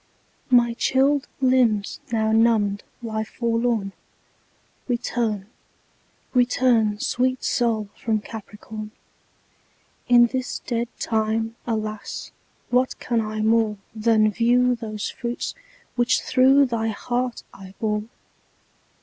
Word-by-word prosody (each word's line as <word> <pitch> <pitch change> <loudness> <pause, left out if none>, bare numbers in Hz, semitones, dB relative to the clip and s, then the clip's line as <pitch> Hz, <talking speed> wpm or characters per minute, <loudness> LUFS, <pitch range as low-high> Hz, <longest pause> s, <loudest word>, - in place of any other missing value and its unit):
My 240 -2 +4
chilled 270 +3 +2
limbs 245 -6 +2
now 220 -1 +1
numbed 220 -3 +3 0.2
lie 220 -1 -2
forlorn; 230 -3 -1 1.0
Return; 235 -4 -1 0.9
return, 245 -4 +3
sweet 255 +3 0
Sol, 230 -4 +1
from 220 -2 -1
Capricorn; 215 0 -8 1.2
In 240 -1 +7
this 255 +1 -3
dead 235 -1 -1
time, 225 0 -1
alas, 215 -2 -4 0.4
what 255 +1 +2
can 235 -2 0
I 215 0 -3
more 220 -1 +2 0.2
Than 215 -1 +3
view 245 +3 +3
those 215 -3 -5
fruits 240 0 -4 0.4
which 240 0 +2
through 270 +2 +5
thy 230 -3 -1
heart 245 +3 -2
I 195 0 -12
bore? 210 -1 -1
230 Hz, 100 wpm, -23 LUFS, 215-245 Hz, 1.2 s, In